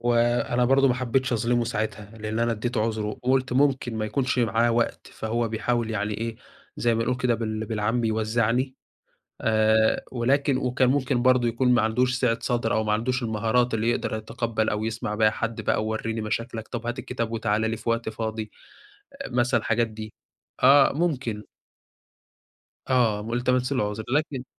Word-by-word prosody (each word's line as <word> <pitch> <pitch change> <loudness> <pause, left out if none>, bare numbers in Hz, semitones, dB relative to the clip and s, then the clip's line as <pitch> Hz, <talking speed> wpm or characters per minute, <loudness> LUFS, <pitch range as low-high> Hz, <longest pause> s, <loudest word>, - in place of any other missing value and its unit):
وأنا 120 +1 +2
برضو 135 +2 +4
ما 125 - +2
حبيتش 130 +1 0
اظلمه 120 +1 +1
ساعتها، 105 -3 -3
لإن 110 +1 -3
أنا 115 0 +1
ادّيته 115 +1 -2
عُذره 110 -1 -1
وقُلت 130 +4 0
ممكن 130 -3 +1
ما 110 - -1
يكونش 130 +3 -1
معاه 115 0 +2
وقت، 115 0 -1
فهو 115 +1 -2
بيحاول 115 +1 -1
يعني 105 -1 -2
إيه 115 +1 -4 0.4
زي 120 -1 +1
ما 115 - 0
نقول 125 - 0
كده 125 -1 +1
بال 110 -1 -3
بالعام 110 +2 0
بيوزّعني، 115 +3 0 0.7
آآ، 110 0 +3
ولكن 135 +3 +1
وكان 130 0 +1
ممكن 130 -2 +1
برضو 130 -1 +4
يكون 120 +2 +1
ما 120 - +3
عندوش 125 +3 +1
سِعة 120 -2 +1
صَدر 120 -2 0
أو 110 - +1
ما 105 - 0
عندوش 125 +4 0
المهارات 115 +2 +1
اللي 115 +1 +1
يقدر 115 -2 -1
يتقبّل 110 0 -2
أو 105 +1 -1
يسمع 110 -1 -3
بيها 110 0 +4
حد 115 +1 -3
بقى، - - 0
وورّيني 110 +1 -2
مشاكلك، 110 +1 -4
طب 120 -1 -5
هات 120 +2 -3
الكتاب 115 -3 -4
وتعالَ 110 -2 0
لي 115 - -2
في 115 - -7
وقت 115 0 0
فاضي، 110 -1 -4 0.6
أ 275 0 -7
مثلًا 120 0 +1
الحاجات 115 +2 +1
دي، 110 0 -8 0.5
آه 135 +2 +7
ممكن. 135 -9 -1 1.5
آه، 120 -5 +2
والتمسْت 125 +4 0
له 130 - +1
العُذر، 105 +1 -4
لكن 145 -4 -2
115 Hz, 170 wpm, -25 LUFS, 110-125 Hz, 1.5 s, آه